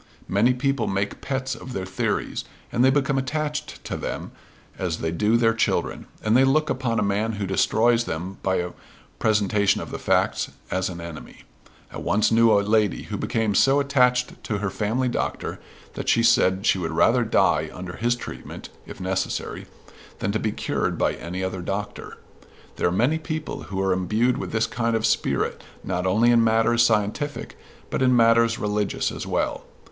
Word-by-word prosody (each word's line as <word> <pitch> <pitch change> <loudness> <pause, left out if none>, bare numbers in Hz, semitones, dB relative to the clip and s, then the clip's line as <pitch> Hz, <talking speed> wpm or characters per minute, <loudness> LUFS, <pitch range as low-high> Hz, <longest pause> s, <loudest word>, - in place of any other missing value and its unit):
Many 115 +6 +3
people 135 -2 0
make 100 +1 -2
pets 135 -1 -2
of 130 - -8
their 95 -4 -3
theories; 95 0 -2 0.3
and 120 - +2
they 130 - +6
become 140 0 +1
attached 150 +2 -3
to - - -3
them - - -5 0.5
as 90 -4 -1
they 80 - -2
do 105 +7 +2
their 115 -1 +3
children; 115 - -1 0.2
and 110 +1 +2
they 130 - +6
look 145 +3 +2
upon 125 -3 -1
a - - +2
man 105 +3 0
who 100 -1 -3
destroys 115 +5 +2
them 90 +4 -5
by 95 -1 +1
a 90 0 -2 0.5
presentation 105 -2 +2
of - - -7
the - - -5
facts - - +1 0.2
as 95 0 0
an 85 -2 -7
enemy. 85 -2 -10 0.5
I - - -5
once 105 +7 +1
knew 115 0 +5
a 100 -1 +5
lady 105 -2 +2
who - - -5
became 110 -2 0
so 135 +8 +4
attached 125 -3 +1
to 105 - -1
her 100 -1 -2
family 115 +5 -1
doctor 120 - -3 0.3
that, - - -3
she 115 - +4
said, 95 -3 +3
she 95 - +3
would 85 -3 -2
rather 120 +9 +4
die 110 - +2
under 90 0 -7
his 120 +2 +1
treatment, 120 - -8 0.2
if - - -10
necessary, 95 0 -3 0.5
than 100 - -1
to 110 - -1
be 110 - -1
cured - - -2
by - - +1
any 90 +3 -5
other 95 -1 -3
doctor. 100 +3 -5 0.6
There - - +2
are - - +1
many 125 - +2
people 155 -1 -5
who 95 0 -4
are 95 -1 +2
imbued 110 +7 +1
with - - -5
this 110 0 +1
kind 115 0 -1
of 110 0 0
spirit - - 0 0.2
not 90 +1 -2
only 110 +6 +4
in 115 -1 +5
matters 115 +1 +3
scientific, 115 +6 0 0.4
but - - -1
in 125 -1 +4
matters 115 0 +4
religious 105 -1 -1
as - - -6
well. - - -1
110 Hz, 185 wpm, -24 LUFS, 95-125 Hz, 0.6 s, they